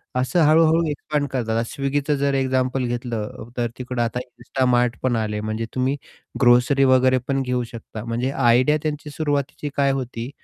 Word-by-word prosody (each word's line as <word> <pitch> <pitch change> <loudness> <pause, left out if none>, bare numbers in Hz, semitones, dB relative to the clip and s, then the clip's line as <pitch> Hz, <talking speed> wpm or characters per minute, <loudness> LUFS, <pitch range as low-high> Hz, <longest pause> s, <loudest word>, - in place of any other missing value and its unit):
असं 130 +7 +1
हळू-हळू 160 +2 +5
एक्सपांड 145 0 -2
करतात, 115 -3 -1 0.2
Swiggy 140 +1 0
जर 140 0 0
एक्झाम्पल 130 -1 0
घेतलं 120 -2 -4
तर 120 -1 +1
तिकडं 125 -1 -3
आता 120 +1 -1
insta 125 +1 -3
mart 120 -1 +2
पण 125 -2 +1
आले 105 -1 -1
म्हणजे 110 +1 -3
तुम्ही 130 +2 +1 0.5
ग्रोसरी 125 +3 +5
वगैरे 130 -1 +4
पण 135 -1 0
घेऊ 125 -1 -1
शकता 110 -2 -8
म्हणजे 120 +3 -1
आयडिया 130 +3 +3
त्यांची 150 -1 -3
सुरुवातीची 145 -1 -2
काय 140 -1 +3
होती 125 -2 -4
130 Hz, 160 wpm, -22 LUFS, 120-140 Hz, 0.5 s, हळू-हळू